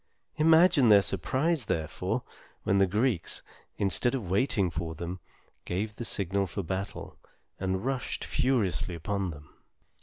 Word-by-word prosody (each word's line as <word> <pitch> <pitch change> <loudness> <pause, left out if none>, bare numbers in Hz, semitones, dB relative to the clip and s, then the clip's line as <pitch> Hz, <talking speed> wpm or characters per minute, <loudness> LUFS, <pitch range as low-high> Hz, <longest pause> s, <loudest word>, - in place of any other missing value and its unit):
Imagine 160 -4 +6
their 100 -2 +7
surprise, 130 - 0
therefore, 80 -4 -2 0.4
when 100 - +2
the 95 - +5
Greeks, 105 -1 0 0.3
instead 100 +7 +1
of 115 -8 -4
waiting 100 -3 +2
for 80 0 -4
them, 85 +3 -5 0.4
gave 105 +4 -3
the 120 - -5
signal 100 -1 0
for 95 +3 -4
battle, 95 +4 -5 0.4
and 95 +2 -1
rushed 135 -1 -2
furiously 110 -9 0
upon 95 +3 -2
them. 75 -2 -11
100 Hz, 130 wpm, -29 LUFS, 90-125 Hz, 0.4 s, their